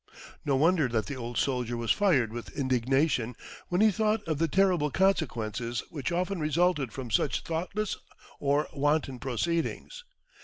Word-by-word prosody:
No 140 - +1
wonder 160 +1 +3
that 115 -4 -1
the 100 - -5
old 120 -2 -5
soldier 125 -3 0
was 115 -1 0
fired 135 - +3
with 120 +5 -8
indignation 130 -1 +1 0.3
when 180 +2 +1
he 215 0 +6
thought 215 +1 +1
of 155 -3 -1
the 165 - +2
terrible 180 -3 +2
consequences 120 - 0
which 145 -3 -3
often 180 +2 -1
resulted 155 -4 +1
from 125 -2 -7
such 130 - +1
thoughtless 185 +6 -2 0.4
or 145 +2 +1
wanton 145 -2 0
proceedings. 170 - -2
145 Hz, 150 wpm, -29 LUFS, 125-175 Hz, 0.4 s, he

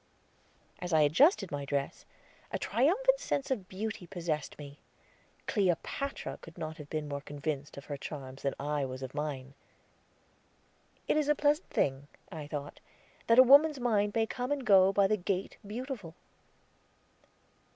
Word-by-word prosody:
As 180 -1 -4
I 155 - +5
adjusted 195 - +4
my 145 -1 -3
dress, 140 0 -3 0.5
a - - -1
triumphant 395 - +2
sense 280 - -2
of 200 -8 -2
beauty 200 -2 -5
possessed 170 -5 -3
me; 145 -1 -10 0.7
Cleopatra 205 - -1
could 165 0 -13
not 160 -1 -5
have 150 -3 -10
been 155 -1 -3
more 140 -1 -4
convinced 145 0 -5
of 140 - -9
her 145 - -5
charms 135 -2 -7
than 140 - -1
I 145 0 -1
was 130 0 -5
of 130 - -6
mine. 140 -3 -4 1.5
"It - - +2
is 300 -2 +1
a 295 - +5
pleasant 295 +3 +1
thing," 135 +1 0 0.2
I 155 -3 -6
thought, 145 -1 -6 0.5
"that 230 - +5
a 255 - +11
woman's 285 +3 +6
mind 210 -4 +1
may 225 -1 +3
come 250 +4 -4
and 280 -3 -1
go 195 -3 +6
by 200 0 +4
the 215 +2 +2
gate 190 0 -2
Beautiful." 220 - -6
180 Hz, 155 wpm, -31 LUFS, 145-245 Hz, 1.5 s, a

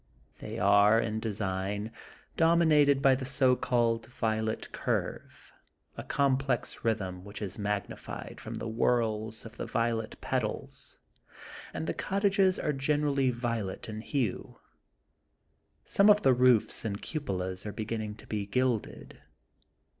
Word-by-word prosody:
They - - -6
are, 100 +2 +5
in 110 -1 -1
design, 100 -1 -2 0.4
dominated 155 -4 +4
by 135 - +6
the 130 +1 -2
so 130 -1 +3
called 115 -2 +1
Violet 110 -2 -2
Curve,*' - - -4 0.4
a - - -5
complex 135 -2 0
rhythm, 95 -5 -1
which 100 +2 -9
is 100 -2 -5
magnified 105 -1 -4
from - - -6
the - - -5
whorls 110 -1 0
of 115 +1 -11
the - - -4
violet 115 -1 -1
petals, - - -3 0.7
and 80 0 -4
the 85 - -1
cottages 195 -1 +2
are 150 - -1
generally 140 -1 +1
violet 115 -5 -3
in 110 -1 -5
hue. 120 -5 -2 1.3
Some 200 +1 +4
of 210 0 +6
the 135 - +6
roofs 125 -3 +3
and 100 -3 -3
cupolas 95 - -3
are - - -3
beginning 110 -1 -4
to - - -15
be 105 -2 -3
gilded. 125 +1 -2
115 Hz, 130 wpm, -30 LUFS, 105-135 Hz, 1.3 s, by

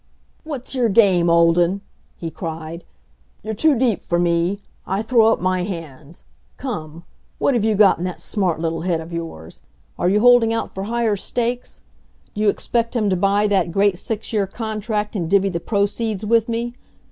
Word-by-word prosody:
"What's 285 -6 -6
your 245 -3 +1
game, 190 -5 +4
Olden?" 170 +3 +3 0.4
he 165 -1 -5
cried. 165 0 -6 0.6
"You're 220 +1 -3
too 285 +5 +3
deep 235 -4 +1
for 175 - -1
me; 175 +3 +1 0.3
I 195 +3 -1
throw 225 -1 +4
up - - 0
my 185 0 0
hands. 165 -4 -7 0.3
Come; 170 - -6 0.3
what've 245 -6 +1
you 220 -1 +2
got 200 -4 +5
in - - -3
that 180 - -5
smart 185 -6 -1
little 165 0 -2
head 170 -1 0
of 165 +1 -9
yours? 125 - -7 0.4
Are 175 - +2
you 205 +2 +3
holding 245 -1 +5
out 225 - -2
for 190 +1 -5
higher 230 -1 0
stakes? 240 +4 -3 0.5
Do 210 - -4
you 215 - +4
expect 230 +3 -1
him 210 -4 +1
to - - +2
buy 200 +3 +2
that 190 -4 +1
great 200 +1 +2
six 220 +1 -4
year 205 -3 +1
contract 215 0 -3
and 170 -5 -2
divvy 195 +1 +3
the 170 -2 -3
proceeds 205 +1 -1
with 230 +1 +2
me? 235 +1 -2
200 Hz, 180 wpm, -21 LUFS, 170-225 Hz, 0.6 s, got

